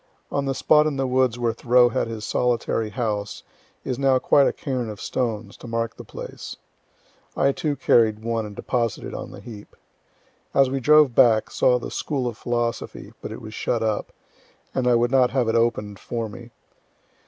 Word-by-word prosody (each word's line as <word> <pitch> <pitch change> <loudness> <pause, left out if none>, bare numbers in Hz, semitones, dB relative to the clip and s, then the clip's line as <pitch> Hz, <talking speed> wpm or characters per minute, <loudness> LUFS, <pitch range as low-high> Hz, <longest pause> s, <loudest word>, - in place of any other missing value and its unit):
On 140 0 -1
the 135 -1 -1
spot 150 +2 +4
in 145 -3 -2
the 135 - 0
woods 130 -2 +1
where 120 -2 0
Thoreau 120 +1 +4
had 115 - -1
his 110 -2 -6
solitary 120 -2 0
house 105 -2 -3 0.4
is 130 -1 -3
now 135 -1 +4
quite 140 +2 +4
a - - +2
cairn 130 -5 -3
of 105 -2 -8
stones, 110 -4 -3
to - - -11
mark 115 0 -2
the - - -10
place; - - -8 0.8
I 140 - +3
too 145 +1 -2
carried 110 -5 +3
one 115 -1 -1
and 105 - -10
deposited 115 -1 -2
on - - -6
the - - -11
heap. 105 -4 -11 0.8
As 135 -2 +4
we 135 - -1
drove 150 -1 +5
back, 115 -2 +4
saw 125 - +3
the 120 - -7
"School 140 -4 -2
of 120 -2 -3
Philosophy," 120 0 -3
but - - -6
it - - -8
was 110 - -8
shut 115 0 -1
up, 110 -2 -1 0.6
and 130 -2 0
I 120 - +5
would 120 +1 +2
not 130 -2 +4
have 130 -3 0
it 115 - +1
open'd 105 -3 0
for 115 -2 -4
me. 120 +3 -11
120 Hz, 190 wpm, -23 LUFS, 115-130 Hz, 0.8 s, drove